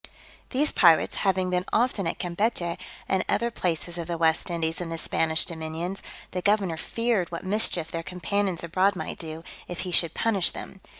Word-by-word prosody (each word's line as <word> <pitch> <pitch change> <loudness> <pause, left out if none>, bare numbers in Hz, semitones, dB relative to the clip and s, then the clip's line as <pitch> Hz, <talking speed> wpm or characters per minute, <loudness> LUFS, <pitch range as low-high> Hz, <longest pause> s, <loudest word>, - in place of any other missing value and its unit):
These 290 +3 +2
pirates 170 -4 +5
having 185 -2 +1
been 180 0 +1
often 225 -5 +2
at - - -2
Campechy, 175 -1 -1 0.3
and 190 -1 +2
other 235 0 +1
places 175 -2 -2
of 165 - -4
the 170 -1 -2
West 160 +2 +2
Indies 165 -1 -1
in 175 - -4
the 165 - -3
Spanish 160 0 +2
dominions, 165 +3 -4 0.3
the 180 - -2
governor 200 -4 +2
feared 225 0 0
what 170 - -5
mischief 185 -5 +1
their 165 - -2
companions 180 +2 -1
abroad 185 +4 +2
might - - -5
do, 160 0 -6 0.2
if 175 - -4
he 185 - -4
should 170 -2 +2
punish 205 -6 +2
them. 195 - -9
175 Hz, 180 wpm, -27 LUFS, 165-195 Hz, 0.3 s, pirates